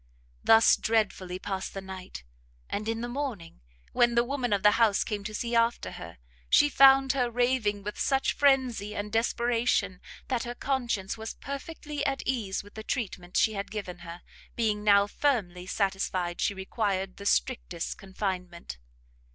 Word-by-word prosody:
Thus 225 0 +6
dreadfully 200 -5 0
passed 190 0 -5
the - - -3
night; 190 - -9 0.4
and 215 +2 -3
in 225 0 -2
the 240 - -3
morning, 240 - -5 0.3
when 240 0 +3
the 235 - +4
woman 250 -2 -2
of 200 -2 +1
the 210 - +7
house 215 -3 +4
came 210 -2 -4
to 215 - -5
see 235 +2 -2
after 230 +1 +1
her, - - -9 0.3
she 290 - +5
found 270 0 +6
her 250 -3 +1
raving 240 -4 0
with 210 +1 -6
such 270 -1 +1
frenzy, 255 -7 +2
and 210 0 -4
desperation, 235 -4 +1 0.3
that 250 -3 0
her 240 -1 -5
conscience 240 -8 -2
was 220 0 -6
perfectly 290 +1 -6
at 270 0 -1
ease 220 -8 -2
in 205 - -15
the 220 - -7
treatment 190 -7 -4
she 220 - +3
had 200 -1 -4
given 190 -4 -6
her, 170 +1 -10 0.3
being 215 -3 0
now 200 -1 +5
firmly 200 -8 -1
satisfied 190 -3 -1
she 200 - +1
required 190 -1 -2
the 200 - -9
strictest 185 -11 -1
confinement. 180 - -5
215 Hz, 160 wpm, -28 LUFS, 190-245 Hz, 0.4 s, the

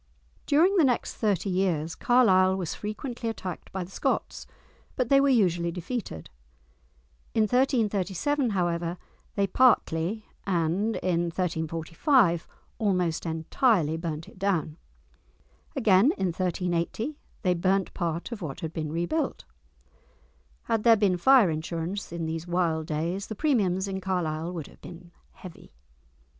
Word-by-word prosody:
During 345 +7 +4
the 340 - +5
next 250 -4 +1
thirty 200 -3 0
years 170 -4 0
Carlisle 190 -7 +4
was 180 -4 -3
frequently 230 +3 -5
attacked 190 -5 -6
by 190 -1 -3
the 180 - -12
Scots, - - -2 0.5
but 250 -2 -1
they 275 0 +6
were 280 - +3
usually 175 -8 +2
defeated. 180 - -5 1.1
In 220 - +4
1337, 235 +1 +1
however, 175 -3 -1 0.4
they 200 - +2
partly, 210 -4 +2 0.2
and 185 +5 0
in 175 -2 +1
1345 170 - +1 0.3
almost 180 -6 0
entirely 160 - +1
burnt 165 -1 -5
it - - -16
down. 175 -6 -1 1.0
Again 210 -6 +4
in 190 - 0
1380 180 - -2 0.2
they 180 -2 +3
burnt 185 +2 0
part 170 +3 -3
of 225 -3 -6
what 145 -6 -6
had 160 0 -5
been 155 -2 -3
rebuilt! 175 - -2 1.2
Had 225 - 0
there 230 0 +6
been 200 -3 +2
fire 240 -2 +5
insurance 165 +5 -4
in 170 -1 -3
these 160 +1 -4
wild 170 -3 0
days, 170 +6 -2
the 220 - -6
premiums 200 - +1
in 190 -1 -4
Carlisle 170 -3 -2
would 165 -5 -5
have - - -17
been 170 +2 -11 0.2
heavy! 185 -7 -13
185 Hz, 130 wpm, -27 LUFS, 170-220 Hz, 1.2 s, they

